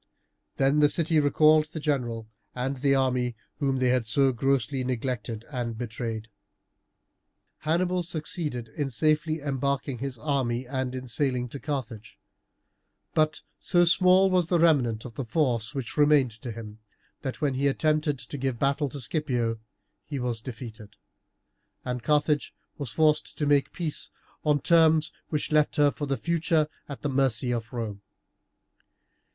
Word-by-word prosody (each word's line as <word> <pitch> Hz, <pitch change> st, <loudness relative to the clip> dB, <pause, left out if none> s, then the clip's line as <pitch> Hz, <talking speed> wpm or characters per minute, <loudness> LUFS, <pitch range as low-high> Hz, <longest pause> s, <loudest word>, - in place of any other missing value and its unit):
Then 135 Hz, +2 st, +3 dB
the 150 Hz, -1 st, +5 dB
city 160 Hz, 0 st, +2 dB
recalled 155 Hz, +1 st, +5 dB
the 155 Hz, -, -7 dB
general 120 Hz, -7 st, -1 dB, 0.3 s
and 130 Hz, +2 st, -2 dB
the 135 Hz, +1 st, +2 dB
army 125 Hz, -2 st, +1 dB, 0.2 s
whom 135 Hz, -2 st, +1 dB
they 130 Hz, -1 st, +2 dB
had 125 Hz, -3 st, +1 dB
so 135 Hz, +4 st, +3 dB
grossly 135 Hz, +1 st, 0 dB
neglected 125 Hz, -2 st, -3 dB
and 120 Hz, -4 st, -3 dB
betrayed. 115 Hz, -1 st, -4 dB, 1.3 s
Hannibal 180 Hz, +3 st, +1 dB
succeeded 155 Hz, -7 st, -3 dB
in 140 Hz, +4 st, -3 dB
safely 155 Hz, +4 st, +1 dB
embarking 140 Hz, -2 st, -1 dB
his 135 Hz, -1 st, -4 dB
army 130 Hz, -2 st, -1 dB
and 130 Hz, 0 st, -3 dB
in 130 Hz, 0 st, -5 dB
sailing 125 Hz, 0 st, 0 dB
to 140 Hz, -, -7 dB
Carthage; 130 Hz, -8 st, -5 dB, 1.0 s
but 155 Hz, 0 st, +1 dB, 0.2 s
so 175 Hz, 0 st, +3 dB
small 185 Hz, +2 st, +5 dB
was 180 Hz, -3 st, +2 dB
the 175 Hz, -, +2 dB
remnant 135 Hz, -10 st, +3 dB
of 120 Hz, -, -8 dB
the 135 Hz, -, -4 dB
force 120 Hz, -1 st, 0 dB
which 135 Hz, 0 st, -4 dB
remained 145 Hz, -4 st, +5 dB
to 125 Hz, -, -5 dB
him, 110 Hz, -1 st, -9 dB, 0.4 s
that 130 Hz, -2 st, -4 dB
when 145 Hz, -3 st, +1 dB
he 135 Hz, +2 st, +1 dB
attempted 155 Hz, +1 st, +1 dB
to 140 Hz, +2 st, -7 dB
give 130 Hz, -2 st, -1 dB
battle 140 Hz, +3 st, +1 dB
to 140 Hz, -, -7 dB
Scipio 120 Hz, -5 st, -1 dB, 0.4 s
he 145 Hz, -, -5 dB
was 120 Hz, -3 st, -2 dB
defeated, 115 Hz, -4 st, -9 dB, 0.9 s
and 125 Hz, -1 st, -3 dB
Carthage 150 Hz, 0 st, +1 dB, 0.2 s
was 140 Hz, -4 st, -3 dB
forced 155 Hz, +3 st, +2 dB
to 150 Hz, -, 0 dB
make 145 Hz, -1 st, +3 dB
peace 160 Hz, -4 st, -4 dB, 0.3 s
on 150 Hz, -2 st, +2 dB
terms 160 Hz, -1 st, +4 dB, 0.2 s
which 150 Hz, -1 st, -2 dB
left 150 Hz, -1 st, +3 dB
her 145 Hz, -1 st, +4 dB
for 145 Hz, -, -5 dB
the 135 Hz, -1 st, 0 dB
future 165 Hz, +1 st, +1 dB, 0.2 s
at 140 Hz, -, -8 dB
the -, -, +1 dB
mercy 130 Hz, -2 st, +1 dB
of 120 Hz, 0 st, -3 dB
Rome. 110 Hz, -5 st, -4 dB
135 Hz, 150 wpm, -27 LUFS, 125-150 Hz, 1.3 s, the